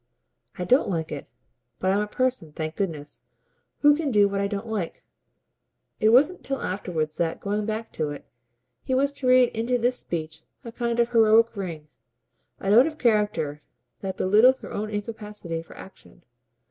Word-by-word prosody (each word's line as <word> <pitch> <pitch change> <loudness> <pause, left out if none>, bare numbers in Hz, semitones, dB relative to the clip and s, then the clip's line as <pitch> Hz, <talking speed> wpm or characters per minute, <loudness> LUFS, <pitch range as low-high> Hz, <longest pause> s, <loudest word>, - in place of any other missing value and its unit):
"I 180 - -3
don't 250 +8 +3
like 160 -4 -2
it, 145 - -6 0.5
but 185 - 0
I'm 200 - +2
a 210 - -2
person, 255 -8 -1
thank 155 +1 -5
goodness, 150 -9 -4 0.6
who 295 0 +6
can 310 -1 -2
do 205 -4 +4
what 200 0 -2
I 200 - +1
don't 200 +2 -4
like." 215 -7 -4 1.0
It 215 - +4
wasn't 285 +10 +4
till 270 0 -2
afterwards 165 -5 -3
that, 165 -1 -1
going 205 +1 -2
back 220 +1 -4
to 155 -2 -2
it, 145 - -8 0.6
he 260 - -1
was 280 +2 +1
to 270 -2 -4
read 255 -1 +6
into 235 +3 -1
this 245 +1 0
speech 160 -2 -4 0.2
a 230 - -6
kind 235 0 -2
of 235 0 +3
heroic 225 -1 +4
ring, 170 -6 -6 0.7
a 195 - -1
note 240 +7 +7
of 310 -1 -6
character 210 - +1 0.4
that 190 -1 -5
belittled 220 +7 +5
his - - -10
own 215 +1 -3
incapacity 210 -5 -5
for 165 - -15
action. 190 -2 -14
210 Hz, 175 wpm, -25 LUFS, 175-240 Hz, 1.0 s, note